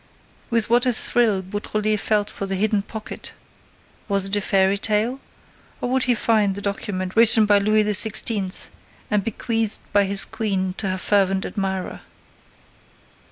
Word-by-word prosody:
With 230 Hz, -3 st, +1 dB
what 240 Hz, +2 st, +2 dB
a 250 Hz, -, +2 dB
thrill 220 Hz, -4 st, +2 dB
Beautrelet 210 Hz, +2 st, -2 dB
felt 210 Hz, -1 st, 0 dB
for 195 Hz, -, -6 dB
the 195 Hz, -, -1 dB
hidden 210 Hz, +1 st, +1 dB
pocket! 215 Hz, +1 st, -8 dB, 0.7 s
Was 200 Hz, -2 st, +2 dB
it 195 Hz, +1 st, 0 dB
a 205 Hz, -, 0 dB
fairy 195 Hz, 0 st, +2 dB
tale? 225 Hz, +6 st, 0 dB, 0.6 s
Or 245 Hz, -, -3 dB
would 260 Hz, 0 st, +2 dB
he 245 Hz, -2 st, +2 dB
find 215 Hz, -3 st, +1 dB
the -, -, -5 dB
document 190 Hz, -2 st, -4 dB
written 225 Hz, -1 st, +6 dB
by 205 Hz, -1 st, +4 dB
Louis 215 Hz, +1 st, +2 dB
XVI. 210 Hz, -1 st, +2 dB, 0.4 s
and 210 Hz, -1 st, +1 dB
bequeathed 225 Hz, 0 st, -2 dB
by 205 Hz, -1 st, +4 dB
the 195 Hz, 0 st, +1 dB
queen 190 Hz, -4 st, -2 dB
to 195 Hz, -, -2 dB
her 185 Hz, -, -2 dB
fervent 195 Hz, 0 st, +1 dB
admirer? 190 Hz, -3 st, -4 dB
205 Hz, 155 wpm, -21 LUFS, 195-220 Hz, 0.7 s, written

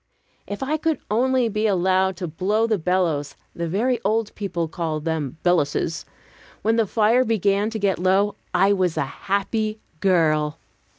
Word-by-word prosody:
If 205 Hz, +6 st, -4 dB
I 300 Hz, +4 st, 0 dB
could 320 Hz, 0 st, 0 dB
only 255 Hz, +2 st, +2 dB
be 215 Hz, 0 st, 0 dB
allowed 190 Hz, -1 st, +2 dB
to 180 Hz, -1 st, -4 dB
blow 200 Hz, +8 st, 0 dB
the 220 Hz, -3 st, 0 dB
bellows 160 Hz, -5 st, 0 dB, 0.2 s
the 170 Hz, 0 st, -3 dB
very 235 Hz, +8 st, 0 dB
old 220 Hz, +1 st, 0 dB
people 180 Hz, -5 st, -3 dB
called 160 Hz, -1 st, -3 dB
them 160 Hz, -3 st, -2 dB
"belluses" 165 Hz, -2 st, +1 dB, 0.6 s
when 225 Hz, +1 st, +2 dB
the 225 Hz, -2 st, +2 dB
fire 225 Hz, +5 st, +3 dB
began 205 Hz, -2 st, +1 dB
to 225 Hz, -, -4 dB
get 195 Hz, -5 st, 0 dB
low, 195 Hz, +3 st, +2 dB, 0.2 s
I 195 Hz, +3 st, +4 dB
was 185 Hz, -4 st, 0 dB
a -, -, +2 dB
happy 215 Hz, -, -2 dB, 0.2 s
girl. 155 Hz, -4 st, +2 dB
195 Hz, 160 wpm, -23 LUFS, 170-220 Hz, 0.6 s, I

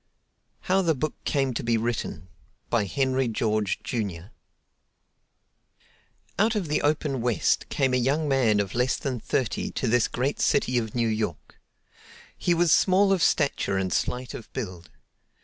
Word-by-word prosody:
How 190 Hz, +1 st, +2 dB
the 165 Hz, -4 st, +1 dB
Book 155 Hz, +3 st, -2 dB
Came 135 Hz, -3 st, 0 dB
To -, -, -2 dB
Be 115 Hz, 0 st, +2 dB
Written 110 Hz, -7 st, -3 dB, 0.4 s
by 115 Hz, -4 st, +2 dB
Henry 130 Hz, +4 st, 0 dB
George, 110 Hz, -2 st, -1 dB
Jr. 100 Hz, -8 st, -4 dB, 2.1 s
Out 220 Hz, +2 st, +3 dB
of 190 Hz, -7 st, -2 dB
the 150 Hz, -, +1 dB
open 145 Hz, -3 st, 0 dB
West 120 Hz, -3 st, +1 dB
came 135 Hz, -2 st, +1 dB
a -, -, +4 dB
young 140 Hz, +5 st, +1 dB
man 125 Hz, -7 st, +3 dB
of 100 Hz, -1 st, -2 dB
less 125 Hz, +2 st, +1 dB
than 130 Hz, -4 st, -3 dB
thirty 125 Hz, +1 st, -1 dB
to 130 Hz, -, -2 dB
this 120 Hz, 0 st, +3 dB
great 130 Hz, +4 st, -2 dB
city 125 Hz, -1 st, +2 dB
of 110 Hz, -1 st, -5 dB
New 120 Hz, -1 st, +1 dB
York. 110 Hz, -7 st, -3 dB, 0.8 s
He 175 Hz, -, +1 dB
was 170 Hz, -1 st, +3 dB
small 195 Hz, +3 st, +4 dB
of 185 Hz, -, 0 dB
stature 140 Hz, -12 st, +1 dB
and 95 Hz, -1 st, -1 dB
slight 125 Hz, 0 st, -2 dB
of 115 Hz, -, -9 dB
build. 90 Hz, -9 st, -6 dB
125 Hz, 155 wpm, -26 LUFS, 110-145 Hz, 2.1 s, a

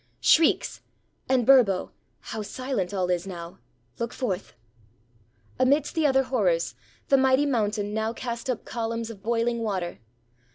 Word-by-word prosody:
shrieks? 325 Hz, 0 st, +3 dB, 0.5 s
And, 255 Hz, -3 st, +3 dB
Burbo, 230 Hz, -9 st, +4 dB, 0.3 s
how 220 Hz, -, -5 dB
silent 230 Hz, -3 st, -3 dB
all 185 Hz, -3 st, 0 dB
is 175 Hz, +1 st, -1 dB
now! 170 Hz, -2 st, -8 dB, 0.4 s
Look 235 Hz, 0 st, -3 dB
forth!" 200 Hz, -7 st, -3 dB, 1.0 s
Amidst 275 Hz, +3 st, +2 dB
the 320 Hz, -2 st, +2 dB
other 270 Hz, -1 st, +3 dB
horrors, 190 Hz, -11 st, +1 dB, 0.4 s
the 275 Hz, -, +6 dB
mighty 265 Hz, +2 st, +4 dB
mountain 210 Hz, -5 st, 0 dB
now 220 Hz, +1 st, -1 dB
cast 235 Hz, +1 st, -5 dB
up 250 Hz, -, -2 dB
columns 230 Hz, 0 st, -3 dB
of 205 Hz, -3 st, -12 dB
boiling 235 Hz, +2 st, 0 dB
water. 190 Hz, -6 st, -3 dB
230 Hz, 135 wpm, -26 LUFS, 200-260 Hz, 1.0 s, the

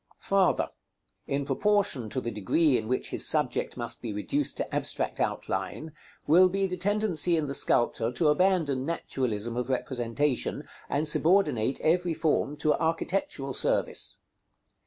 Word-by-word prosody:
§ -, -, -47 dB
XL. -, -, -17 dB
Farther. 195 Hz, -2 st, +2 dB, 0.6 s
In 140 Hz, 0 st, -1 dB
proportion 205 Hz, -, +1 dB
to 130 Hz, -, -3 dB
the 120 Hz, -2 st, -4 dB
degree 130 Hz, -, +2 dB
in 110 Hz, -2 st, -1 dB
which 130 Hz, +2 st, -1 dB
his -, -, +3 dB
subject -, -, +1 dB
must -, -, -4 dB
be 115 Hz, -, -4 dB
reduced 275 Hz, -, -2 dB
to -, -, -4 dB
abstract -, -, -2 dB
outline 160 Hz, 0 st, -3 dB, 0.3 s
will 180 Hz, +5 st, +6 dB
be 195 Hz, +1 st, 0 dB
the 180 Hz, -1 st, -2 dB
tendency 180 Hz, -3 st, +2 dB
in 155 Hz, -, 0 dB
the 140 Hz, -, -4 dB
sculptor 120 Hz, -3 st, +2 dB
to 150 Hz, +5 st, +1 dB
abandon 155 Hz, -5 st, +2 dB
naturalism 120 Hz, -7 st, -3 dB
of 125 Hz, +1 st, -3 dB
representation, 130 Hz, +1 st, -1 dB, 0.2 s
and 150 Hz, +2 st, 0 dB
subordinate 150 Hz, -, +2 dB
every 170 Hz, +1 st, +1 dB
form 155 Hz, -2 st, 0 dB
to 150 Hz, 0 st, +2 dB
architectural 165 Hz, -4 st, -2 dB
service. -, -, 0 dB
150 Hz, 150 wpm, -27 LUFS, 125-180 Hz, 0.6 s, will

